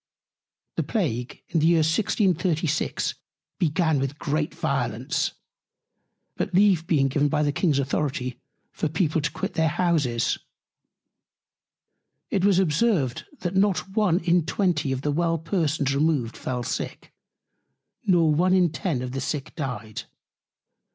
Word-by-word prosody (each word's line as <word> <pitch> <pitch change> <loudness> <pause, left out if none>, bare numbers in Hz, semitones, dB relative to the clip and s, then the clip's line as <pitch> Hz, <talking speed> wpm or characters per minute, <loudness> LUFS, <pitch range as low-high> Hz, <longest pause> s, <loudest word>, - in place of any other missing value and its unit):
The - - +2
Plague 125 - -2
in 165 - +1
the 155 - +3
Year 165 -2 +4
1636 170 -3 +1 0.5
began 160 -3 +2
with 135 +2 -2
great 150 +2 -1
Violence, - - -1 1.0
but - - -2
Leave 185 -4 +4
being 140 -5 +3
given 145 +2 +1
by 150 0 +1
the 145 - +2
King's 150 -1 +1
Authority 130 -3 -2 0.3
for - - -2
People 160 0 +1
to 145 - 0
quit 160 - -4
their 160 0 +2
Houses; 150 -8 +1 1.9
it 195 - +1
was 200 -2 +4
observed, 170 - +1 0.2
That 180 +1 -2
not 195 -1 +2
one 205 -6 +3
in 175 0 +3
twenty 160 -5 0
of 130 0 -2
the 150 - +1
well 165 +2 +1
Persons 155 -4 0
removed 140 -5 +1
fell 125 -1 -3
Sick, - - -5 0.9
nor 170 -5 +4
one 180 +4 +3
in 180 -4 +3
ten 155 -6 -2
of 125 - -4
the 135 +1 -3
Sick 135 +1 -3
dyed. 120 - -5
155 Hz, 135 wpm, -25 LUFS, 140-175 Hz, 1.9 s, Year